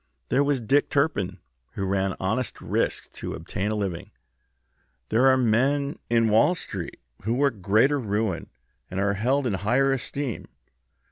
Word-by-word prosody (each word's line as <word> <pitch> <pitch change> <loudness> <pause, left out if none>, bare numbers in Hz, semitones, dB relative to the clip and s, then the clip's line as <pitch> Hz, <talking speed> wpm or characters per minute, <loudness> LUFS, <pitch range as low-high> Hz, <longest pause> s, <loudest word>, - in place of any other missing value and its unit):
There 135 +3 +3
was 140 -3 +1
Dick 140 +6 +2
Turpin, 140 - 0 0.4
who 100 - -3
ran 95 0 0
honest 105 +5 -1
risks - - -1
to - - -6
obtain 100 +3 -3
a 110 - -1
living; 95 -5 -3 1.0
there 120 +5 +4
are 130 0 +6
men 135 +4 +1
in 115 -1 +3
Wall 115 +12 +4
Street 95 - -6 0.2
who 115 +4 -1
work 135 -6 +1
greater 110 +9 +3
ruin, 105 -5 -2 0.4
and 95 - -3
are 100 0 +2
held 130 +7 +1
in 115 - 0
higher 120 +9 +2
esteem. 135 -1 -3
115 Hz, 150 wpm, -25 LUFS, 100-135 Hz, 1.0 s, are